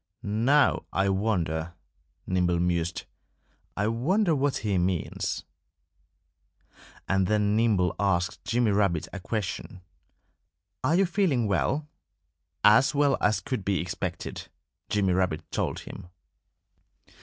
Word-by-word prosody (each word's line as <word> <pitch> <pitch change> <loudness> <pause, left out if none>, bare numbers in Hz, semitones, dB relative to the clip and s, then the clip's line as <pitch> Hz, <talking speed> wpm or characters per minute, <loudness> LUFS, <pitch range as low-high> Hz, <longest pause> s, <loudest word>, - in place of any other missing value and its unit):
"Now, 120 +8 +2
I 95 0 +1
wonder 85 -5 -1 0.3
" - - -45
Nimble 90 -2 +1
mused 85 -1 -1 0.7
"I 105 - +1
wonder 165 - +1
what 140 -1 0
he 100 -3 +1
means." 90 -1 -2 1.6
And 95 -1 +2
then 105 0 +2
Nimble 105 -6 +2
asked 90 -3 0
Jimmy 120 -2 +1
Rabbit 100 -5 +1
a 95 - -5
question: 95 -2 -4 1.0
"Are 150 +6 +2
you 195 +2 +4
feeling 170 - +1
well?" 140 +9 0 0.8
"As 110 +7 +5
well 140 -1 +3
as 105 -1 +2
could 130 -8 -3
be 95 -1 0
expected!" 85 0 -5 0.4
Jimmy 100 -3 +1
Rabbit 90 -4 0
told - - -2
him. - - -10
100 Hz, 115 wpm, -27 LUFS, 90-125 Hz, 1.6 s, As